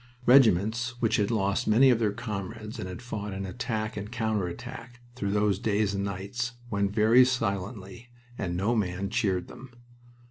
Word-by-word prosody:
Regiments 120 -1 +4
which 115 -3 +2
had 100 -1 +1
lost 100 -3 0
many 130 +5 +6
of 120 - +2
their 110 -3 +1
comrades 105 +1 -6
and 90 - -5
had 90 +7 -8
fought 105 -4 -5
in 95 0 -4
attack 110 +1 -3
and 105 +1 -6
counter 110 -5 -1
attack 120 +6 -9
through 105 -5 -3
those 105 -1 +1
days 105 -1 +1
and 100 0 -2
nights 100 +5 -3 0.2
went 100 -1 +1
very 110 +4 +5
silently, 115 -1 -3 0.3
and 90 -6 -3
no 105 +6 +1
man 100 -1 -2
cheered 95 -6 0
them. 130 - -11
105 Hz, 170 wpm, -28 LUFS, 100-120 Hz, 0.3 s, many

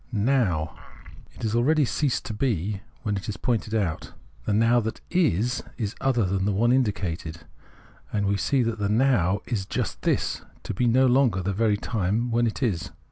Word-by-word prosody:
" - - -32
Now 105 - +1 0.3
"; - - -18
it - - -11
has 110 -1 0
already 145 +5 +3
ceased 140 +1 -1
to 110 - -4
be 105 -4 -1 0.2
when 105 -3 -1
it 100 - -6
is 100 - -4
pointed 115 0 -1
out. 95 -8 -2 0.3
The 105 - 0
Now 115 +3 +4
that 110 -1 -3
is, 130 - +1 0.2
is 105 -4 -2
other 120 -5 +2
than 95 +1 0
the 105 - +2
one 115 +5 +2
indicated, 95 -10 -1 0.7
and 100 -1 0
we 100 +1 +2
see 130 +5 +1
that 115 -1 -2
the 100 -1 0
Now 105 -5 +2
is 105 -6 -2
just - - -3
this - - 0
— - - -29
to - - -4
be 120 +6 +1
no 130 +3 +4
longer 125 -7 +3
the 100 +2 -1
very 105 0 +2
time 110 +2 -1
when 120 +1 +2
it 115 - -3
is. 95 - -1
110 Hz, 200 wpm, -25 LUFS, 100-120 Hz, 0.7 s, Now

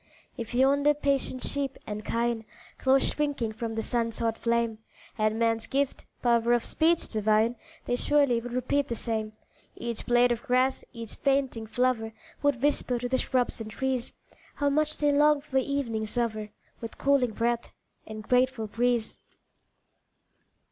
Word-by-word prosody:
If 235 -1 -5
yonder 280 +3 +4
patient 275 -3 0
sheep 275 -2 -1
and 210 0 -5
kine, 235 0 -1 0.4
Close 265 0 +4
shrinking 285 -7 -1
from 225 0 -5
the 225 - -1
sun's 230 -2 -1
hot 230 -1 0
flame, 235 -2 0 0.3
Had 215 -1 0
man's 225 0 +1
gift 275 0 -1 0.2
"power 235 -1 +3
of 240 -1 +1
speech 330 +1 +2
divine," 220 +2 +2 0.3
They 245 - 0
surely 275 -3 +2
would 245 +1 -7
repeat 265 +3 0
the 235 - -3
same 220 -2 -3 0.4
Each 235 -1 -4
blade 245 0 +4
of 235 -1 -1
grass, 260 -1 +1
each 230 -3 -6
fainting 270 -5 0
flower, 225 -1 0 0.3
Would 285 -3 +1
whisper 285 -4 +1
to 245 +1 -3
the 260 +1 +1
shrubs 250 -2 0
and 220 - -6
trees, 260 +1 -2 0.4
How 285 -1 +1
much 305 +1 +1
they 295 -1 +2
longed 295 0 +4
for 265 -2 0
evening's 245 -5 -2
hour, 215 -3 -1 0.3
With 230 -1 -7
cooling 270 -5 +2
breath 235 +1 -1 0.4
and 215 0 -7
grateful 250 -2 +2
breeze. 235 +1 -1
245 Hz, 155 wpm, -28 LUFS, 225-270 Hz, 0.4 s, yonder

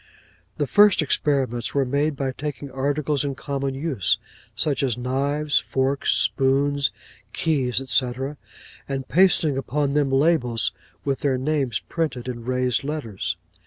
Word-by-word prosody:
'The 145 - +1
first 205 +3 +5
experiments 130 -5 0
were 140 -1 +3
made 145 +3 0
by 135 -1 -2
taking 145 0 -6
articles 140 +2 0
in 140 -2 -2
common 140 0 -3
use, 130 - 0 0.4
such 145 -3 0
as 125 -4 0
knives, 140 +4 0
forks, 135 +1 0
spoons, 140 +1 +2 0.4
keys, 130 -7 +1
&c., 125 0 +3 0.8
and 135 -1 -3
pasting 160 -5 +3
upon 140 +1 -1
them 145 -2 +2
labels 135 - +2 0.3
with 140 -2 0
their 135 -3 +1
names 135 -4 -1
printed 150 -7 -3
in 120 -2 -5
raised 125 0 0
letters. 140 -9 -3
135 Hz, 130 wpm, -23 LUFS, 130-145 Hz, 0.8 s, first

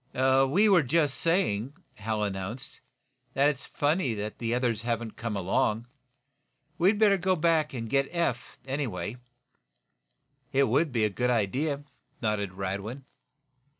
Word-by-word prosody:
"We 135 +9 +4
were 190 -4 +6
just 145 +1 +1
saying," 145 - +1 0.2
Hal 110 +1 -2
announced, 100 +4 -4 0.6
"that 140 +2 +4
it's 140 -2 -5
funny 145 -5 0
the 110 +2 -4
others 120 -3 0
haven't 115 -1 -3
come 115 -3 -3
along. 105 +4 0 0.9
We 180 +3 +5
better 205 -2 +4
go 185 +1 +2
back 160 -2 +2
and 115 -2 -4
get 135 +3 +1
Eph, 155 -9 -2
anyway?" 130 -5 -3 1.3
"It 140 +1 +3
will 135 +6 +3
be 120 -8 0
a - - +1
good 125 +5 0
idea," 135 +6 0 0.4
nodded 105 -4 -1
Radwin. 100 +7 -4
125 Hz, 130 wpm, -28 LUFS, 110-150 Hz, 1.3 s, were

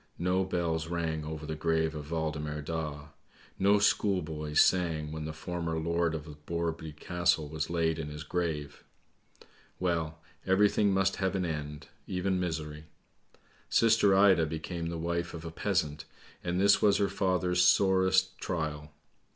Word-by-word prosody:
No 90 +2 +1
bells 85 -3 -1
rang 80 -2 -2
over 75 0 -6
the 80 - -4
grave 80 0 0
of 75 -1 -7
Waldemar 75 -2 -3
Daa. 75 -2 -4 0.5
No 100 +2 +5
schoolboys 80 -7 +1
sang 80 -5 +2
when 80 0 -5
the 80 - -4
former 80 +1 -4
lord 85 0 0
of 75 -1 -6 0.2
Borreby 85 -2 -3
Castle 80 0 0
was 80 +1 -3
laid 80 -2 0
in 75 - -4
his 75 +1 -7
grave. 75 -3 -3 1.0
Well, 80 -3 -1 0.3
everything 100 +1 +3
must 95 0 +1
have 95 0 0
an 95 -1 0
end, 75 -2 -5 0.2
even 95 0 -1
misery! 80 -3 -4 0.8
Sister 110 -4 +4
Ida 95 -5 +5
became 80 +2 -4
the 85 0 -3
wife 85 +1 -2
of 80 0 -8
a 80 - -5
peasant, 80 -5 -1 0.4
and 90 +1 -1
this 100 +1 +5
was 100 -1 +4
her 100 - +2
father's 90 -2 +1
sorest 95 0 +3
trial. 75 -3 -3
85 Hz, 145 wpm, -30 LUFS, 80-90 Hz, 1.0 s, No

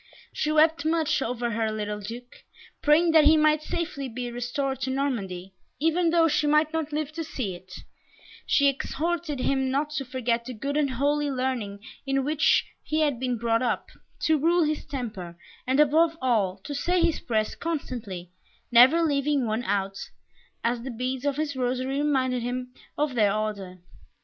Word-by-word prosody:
She 305 - -1
wept 315 -1 +4
much 315 -2 +1
over 240 -1 -2
her 220 0 -1
little 210 -1 -3
Duke, 235 +4 -9 0.4
praying 320 +3 +4
that 315 -2 +6
he 315 +1 +7
might 305 0 +3
safely 310 -5 -4
be 245 +1 -5
restored 250 +3 -3
to 260 - -1
Normandy, 200 -9 -3 0.3
even 325 +3 +2
though 330 0 +4
she 300 -1 +1
might 305 +1 +3
not 320 -2 -2
live 300 0 -2
to 325 +1 -4
see 240 -10 -4
it; 180 +1 -13 0.8
she 280 - +4
exhorted 300 +2 -2
him 265 0 +1
not 290 +3 -1
to 285 -2 -2
forget 240 -2 -1
the 255 -1 -6
good 280 +6 -3
and 295 -2 +2
holy 285 +3 0
learning 250 -7 -2 0.2
in 270 -1 0
which 300 +2 +3 0.2
he 310 +1 -1
had 290 -6 +1
been 250 -1 -1
brought 230 +1 +1
up, 245 - -1 0.3
to 315 -1 +2
rule 340 +3 +3
his 305 0 -1
temper, 210 -11 -6 0.3
and, 260 +2 +2
above 315 +3 +4
all, 215 -8 +1
to 290 - -5
say 355 +6 0
his 335 -1 +2
prayers 215 -3 -1
constantly, 225 - -5 0.4
never 260 +8 +7
leaving 290 -2 +1
out - - -1
one, 205 -3 -1 0.7
as 235 0 0
the 260 - -6
beads 255 +2 -3
of 285 -1 0
his 300 -2 -2
rosary 255 +2 -1
reminded 260 -4 +1
him 250 +1 -4 0.2
of 295 -2 0
their 210 -4 +3
order. 200 -3 -3
270 Hz, 175 wpm, -26 LUFS, 235-300 Hz, 0.8 s, he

